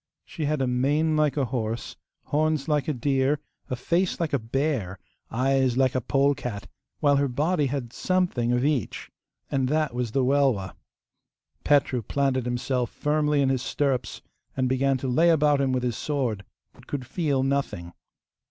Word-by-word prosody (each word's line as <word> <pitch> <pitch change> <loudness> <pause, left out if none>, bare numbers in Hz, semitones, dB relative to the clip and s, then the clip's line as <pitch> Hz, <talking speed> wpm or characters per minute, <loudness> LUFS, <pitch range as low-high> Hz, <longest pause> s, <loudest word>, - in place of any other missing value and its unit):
She 155 - -5
had 150 -2 0
a - - 0
mane 145 +6 +1
like 150 -1 +2
a 140 - +2
horse, 115 -2 -3 0.3
horns 155 -1 0
like 150 -3 +1
a 155 - +1
deer, 135 +3 +1 0.3
a 125 - -1
face 170 +9 0
like 165 -4 -2
a 140 - +2
bear, 115 -5 -2 0.3
eyes 130 +1 +1
like 130 -1 +3
a 130 - 0
polecat; 135 -5 0 0.4
while 145 -2 +4
her 140 0 +2
body 150 +4 +1
had 125 -3 -4
something 180 -11 0
of 125 +2 +1
each. 145 -8 -1 0.4
And 135 -2 +1
that 155 -2 +1
was 120 -2 -2
the 135 - +2
Welwa. 130 -8 +2 0.9
Petru 140 -4 +3
planted 130 +2 0
himself 125 0 -1
firmly 150 -1 +1
in 135 - +2
his 130 -2 0
stirrups, 130 -3 -1 0.3
and 130 -1 +1
began 130 +1 +1
to 130 - -4
lay 160 +7 +4
about 150 -3 +3
him 135 -1 +1
with 130 -1 0
his 120 -2 -1
sword, 125 -9 -2 0.3
but - - -19
could 140 -3 -4
feel 140 -1 0
nothing. 135 -11 -2
135 Hz, 170 wpm, -26 LUFS, 125-150 Hz, 0.9 s, while